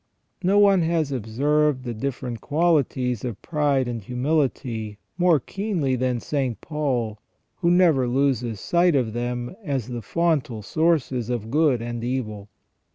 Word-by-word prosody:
No 190 +2 +3
one 200 -3 +6
has 160 -3 0
observed 135 +4 +1
the 120 -2 -4
different 125 0 -4
qualities 145 -7 +1
of 120 -6 -4
pride 145 -5 +1
and 120 -2 -4
humility 125 -3 -1 0.2
more 175 -3 +4
keenly 175 - -2
than 125 -1 0
St. 130 -3 -2
Paul, 125 -9 -2 0.4
who 170 - +1
never 170 -8 +4
loses 125 -4 0
sight 175 - +2
of 120 -5 +1
them 120 +4 -3
as 135 - -2
the 120 -1 -4
fontal 140 - 0
sources 135 -5 +1
of 115 -2 -3
good 145 -5 +2
and 120 0 -4
evil. 110 -5 -3
130 Hz, 140 wpm, -24 LUFS, 120-155 Hz, 0.4 s, one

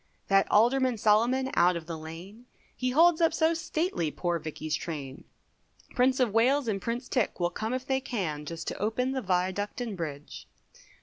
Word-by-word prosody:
That 195 0 +4
Alderman 250 +3 +3
Salomon 235 +6 +2
out 175 +1 +4
of 165 -1 -5
the 165 0 -5
lane, 170 +9 -10 0.3
He 255 - -1
holds 330 +5 +4
up 330 - +3
so 320 +1 +3
stately 325 - -1
poor 175 +2 -2
Vickey's 155 0 -5
train, 140 -5 -6 0.7
Prince 255 +1 +2
of 240 -5 +2
Wales 255 +4 +3
and 200 -3 -1
Prince 240 +4 -3
Tick 250 -7 -1
will 175 0 0
come 220 +5 -3
if 255 0 -3
they 265 -1 0
can, 175 - -3
Just 165 +2 -7
to - - -6
open 235 +5 0
the 265 -1 -2
Viaduct 190 +2 -1
and 235 -4 -4
Bridge. 150 -4 -7
215 Hz, 180 wpm, -28 LUFS, 170-255 Hz, 0.7 s, That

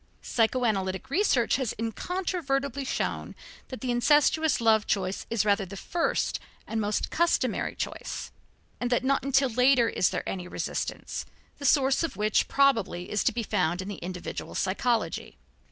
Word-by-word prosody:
Psychoanalytic 225 -2 0
research 280 - +3
has 260 -5 -2
incontrovertibly 280 - -2
shown 260 - -3 0.3
that 260 - -8
the 255 -2 -1
incestuous 295 +4 +3
love 220 -2 +3
choice 190 -1 -1
is 225 -3 +1
rather 200 -1 +3
the 195 +1 -8
first 340 - -1 0.3
and 225 0 -2
most 210 0 -1
customary 340 +1 +1
choice, - - -5 0.5
and 245 - -1
that 245 0 +1
not 275 +1 +1
until 270 0 +3
later 250 0 +4
is - - +2
there - - -4
any 180 -2 -4
resistance, - - -4 0.3
the 285 - -5
source 270 -1 +4
of 330 -5 -2
which 210 0 +2
probably 225 -10 +2
is 210 - +1
to - - +3
be 230 +1 -3
found 180 -5 0
in 190 +2 -4
the 205 - -5
individual 180 0 -6
psychology. 225 +5 -1
240 Hz, 155 wpm, -27 LUFS, 205-275 Hz, 0.5 s, later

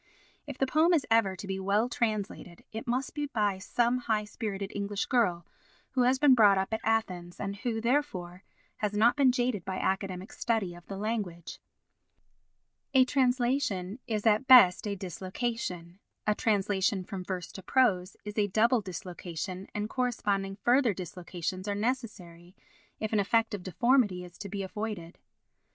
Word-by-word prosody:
If - - -6
the 270 - +2
poem 315 +6 +4
is 300 - +1
ever 220 -4 +3
to 195 - -8
be 190 0 -3
well 200 +4 +1
translated, 215 -7 -3
it 220 +2 -6
must 250 +2 -1
be 295 -1 -2
by 210 -7 0
some 240 +5 +1
high 220 -3 0
spirited 205 -2 -5
English 200 0 -2
girl 180 -10 +1 0.5
who 260 - +1
has 250 +2 +4
been 285 -1 +6
brought 210 -5 +6
up 190 +3 -1
at 220 - -1
Athens 185 -6 -1
and 200 0 -4
who, 225 +1 -2
therefore, 220 -8 -1 0.3
has 210 -1 -2
not 220 +3 +4
been 275 -3 +5
jaded 245 -6 -1
by 190 - -4
academic 190 0 -2
study 220 -7 -1
of 175 0 -14
the 195 - -6
language. 200 -6 -4 1.4
A 260 -1 +7
translation 250 -6 0
is 215 -2 -2
at 220 +4 +3
best 220 -7 +7
a 200 - -2
dislocation, 185 -1 -4 0.3
a 210 - +3
translation 200 -2 +1
from 185 0 -6
verse 180 -1 -5
to 190 - -9
prose 190 -4 +1
is 210 +1 -4
a 205 - +3
double 225 +4 +3
dislocation 180 0 -6
and 210 0 -1
corresponding 205 -6 -1
further 240 +2 +2
dislocations 180 +1 -5
are 205 - -1
necessary 200 -7 -4 0.4
if 215 0 -3
an 215 - +3
effect 225 +2 +2
of 205 - -4
deformity 205 0 +2
is 175 0 -14
to 200 - -6
be 200 0 -4
avoided. 200 -4 -5
205 Hz, 165 wpm, -29 LUFS, 185-235 Hz, 1.4 s, A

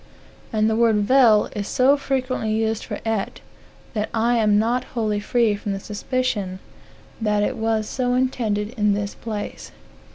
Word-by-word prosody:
And 215 -2 +2
the 220 - +1
word 230 -1 +3
vel 230 -2 +5
is 205 -1 -3
so 265 +3 +4
frequently 255 -5 -2
used 220 0 0
for - - -5
et, 220 -3 -2 0.5
that 215 -2 -2
I 235 +2 +2
amnot 220 +3 +2
wholly 215 -3 0
free 225 0 +1
from 200 -1 -4
a - - -5
suspicion 205 -2 -2 0.6
that 210 -1 +1
it - - -1
was 220 -1 0
so 250 -1 -1
intended 225 -5 0
in 210 -4 +1
this 205 0 -3
place. 215 -3 -6
220 Hz, 155 wpm, -22 LUFS, 210-245 Hz, 0.6 s, vel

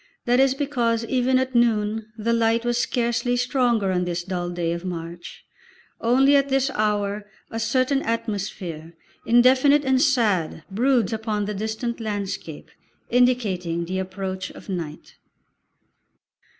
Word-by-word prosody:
That 245 +1 +3
is 270 0 +4
because 240 -5 0
even 255 +1 +2
at 260 0 -1
noon 220 -2 +1
the 230 +2 0
light 230 0 +2
was 240 0 +1
scarcely 240 0 0
stronger 240 -5 +1
on 180 -1 0
this 175 0 -3
dull 175 -1 -3
day 175 -1 -2
of 170 +1 -5
March; 170 -1 -7 0.5
only 265 +5 +4
at 280 0 +3
this 270 0 +1
hour 210 -1 -1 0.2
a 225 - -3
certain 255 +4 +1
atmosphere, 195 - -4 0.3
indefinite 260 +5 +5
and 265 -1 +3
sad, 210 - +1
broods 235 0 +2
upon 215 -2 -2
the 210 - -3
distant 220 +4 -3
landscape, 200 -7 -5 0.4
indicating 200 -9 +1
the 185 +2 -3
approach 190 0 -4
of - - -13
night. 165 -5 -6
225 Hz, 135 wpm, -23 LUFS, 190-245 Hz, 0.5 s, indefinite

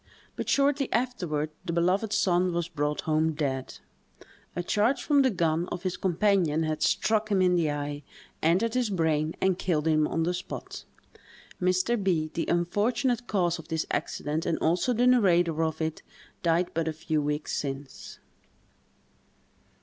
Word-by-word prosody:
But - - -4
shortly 280 -1 +2
afterward 175 -11 -1
the 170 -2 -3
beloved 185 +5 +1
son 185 -4 +2
was 170 -1 -1
brought 150 -3 -2
home 155 0 +1
dead: 135 -3 -3 0.8
a 175 - -2
charge 215 +9 +1
from 290 -2 +4
the 265 - +4
gun 170 -4 0
of 175 -1 -6
his 185 -1 -1
companion 180 -4 +1
had 155 -1 -2
struck 220 -1 +1
him 200 -2 +2
in 180 -1 +4
the 170 -3 +2
eye, 145 0 -3 0.4
entered 190 +8 +2
his 250 -3 +1
brain, 160 -4 0
and 190 -1 +1
killed 160 -4 0
him 155 -1 +3
on 165 - -1
the 175 +2 0
spot. 180 +1 -7 0.8
Mr. 185 +5 +1
B——, 160 -5 0
the 165 - -2
unfortunate 230 +8 0
cause 175 -4 0
of 165 - -11
this 160 -1 -2
accident 155 +2 -2
and 165 - +1
also 175 +9 +1
the 245 +1 +2
narrator 175 -10 +3
of 160 -1 -2
it, 160 -1 -3 0.4
died 170 +1 +1
but 165 0 -1
a 160 - -1
few 155 0 -1
weeks 150 +1 -2
since. 135 -1 -6
175 Hz, 160 wpm, -27 LUFS, 155-200 Hz, 0.8 s, from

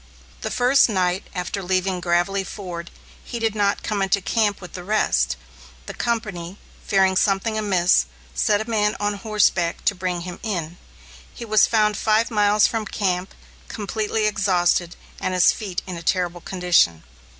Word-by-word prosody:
The - - -3
first 250 +1 +4
night 185 -2 0
after 180 +3 -3
leaving 185 0 0
Gravelly 175 +3 +1
Ford, 175 -4 -7 0.3
he 240 - -6
did 225 -2 0
not 205 -1 0
come 210 -2 -2
into 195 +1 +2
camp 205 +1 0
with 180 - -11
the 180 - -7
rest. 65 - +1 0.5
The - - -7
company, 205 -6 -3 0.3
fearing 190 -2 +3
something 195 +3 +1
amiss, 190 - +2 0.3
sent 205 - +1
a - - -19
man 210 -2 +1
on 205 0 0
horseback 200 -5 0
to - - +3
bring 180 -2 -3
him 180 0 -7
in. 175 -6 -4 0.5
He 235 - -8
was 215 -2 +4
found 210 -2 +2
five 220 +2 +2
miles 210 -1 +4
from 225 -2 -1
camp, 185 -2 -2 0.3
completely 215 +1 -2
exhausted 185 -4 +1 0.2
and 185 - -2
his 180 - +5
feet 195 -4 -5
in 185 -2 -6
a - - -7
terrible 175 0 -1
condition. 175 - +2
195 Hz, 160 wpm, -22 LUFS, 180-215 Hz, 0.5 s, his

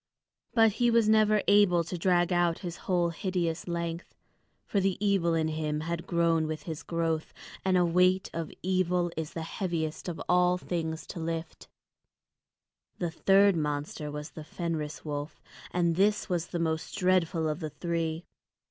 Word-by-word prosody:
But 225 -2 +6
he 240 - +5
was 230 -2 +4
never 215 -1 +4
able 200 -4 +5
to 170 - -5
drag 175 0 +2
out 175 -1 +2
his 175 -1 -4
whole 175 -2 +3
hideous 175 -1 -2
length. 170 0 -4 0.5
For 200 - 0
the 195 -1 +1
evil 195 -5 +2
in 160 -1 +1
him 155 -1 -2
had 170 +1 -4
grown 165 -2 +2
with 155 0 -4
his 160 -3 -5
growth; 165 -2 -2 0.3
and 190 -1 +3
a 180 - +4
weight 180 +2 +3
of 165 -1 -4
evil 180 -1 +1
is 160 -1 -4
the 165 - -4
heaviest 165 -2 -3
of 170 - -5
all 180 0 +4
things 165 -3 -3
to - - -7
lift. 165 0 -5 1.3
The 170 -2 -2
third 195 +2 +4
monster 150 -1 -3
was 150 +1 -6
the 155 - -9
Fenris 160 -2 -4
wolf, 145 0 -5 0.3
and 170 -2 +1
this 205 +3 +2
was 175 -3 -1
the - - -4
most 160 -1 -2
dreadful 180 -3 +2
of 155 +1 -2
the 155 -3 -4
three. 165 0 -3
170 Hz, 165 wpm, -29 LUFS, 160-185 Hz, 1.3 s, But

